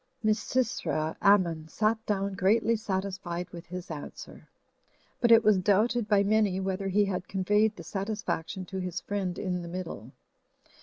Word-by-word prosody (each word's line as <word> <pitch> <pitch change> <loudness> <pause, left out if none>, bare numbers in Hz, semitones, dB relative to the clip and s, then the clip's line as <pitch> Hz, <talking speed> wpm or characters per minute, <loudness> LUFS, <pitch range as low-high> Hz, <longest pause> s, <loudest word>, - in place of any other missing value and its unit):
Misysra 215 -7 0
Ammon 175 -6 +3
sat 220 +6 0
down 200 -1 0
greatly 220 +4 +2
satisfied 190 -4 -3
with 170 -1 -10
his 180 0 -7
answer, 150 -2 -9 0.7
but 235 -1 +3
it 225 0 +8
was 210 -3 +5
doubted 210 +4 +2
by 205 -2 +4
many 205 -2 +2
whether 195 0 -2
he 205 +2 +3
had 180 -2 -3
conveyed 210 +3 +2
the 170 - -9
satisfaction 195 -1 -3
to 190 +1 -5
his 180 -1 -3
friend 195 -3 -3
in 180 -2 -2
the 170 - -7
middle. 170 - -6
195 Hz, 150 wpm, -28 LUFS, 180-210 Hz, 0.7 s, it